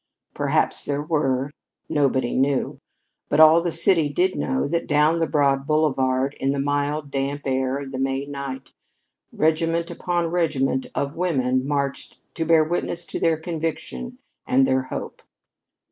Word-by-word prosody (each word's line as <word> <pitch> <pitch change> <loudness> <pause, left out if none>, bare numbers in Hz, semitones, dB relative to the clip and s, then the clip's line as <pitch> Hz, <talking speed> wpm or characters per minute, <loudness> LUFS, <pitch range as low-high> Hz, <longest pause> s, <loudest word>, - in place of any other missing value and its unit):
Perhaps - - 0
there 145 0 -2
were. 140 -4 0 0.4
Nobody 135 -4 +1
knew. 135 +1 0 0.5
But - - +1
all 160 +1 +8
the 170 0 -1
city 165 -2 +3
did 180 +6 +1
know 265 - -1
that 170 +3 -2
down 150 +3 +3
the 165 - +1
broad 140 -2 +1
boulevard, 135 -3 +1
in 135 +1 +1
the 140 - -2
mild, 145 +1 -1
damp 140 +1 -2
air 130 0 0
of 140 -1 -7
the 130 - -5
May 135 +1 -1
night, 140 -1 -7 0.6
regiment 165 +1 0
upon 175 -1 -1
regiment 150 -6 0
of 140 +1 -2
women 130 -7 0
marched 140 -1 -3
to 165 - -2
bear 160 -1 +5
witness 170 +1 -2
to - - -5
their 165 -1 +2
conviction 160 - -5 0.3
and 135 +1 +4
their 130 0 +2
hope. - - -6
145 Hz, 150 wpm, -23 LUFS, 135-160 Hz, 0.6 s, all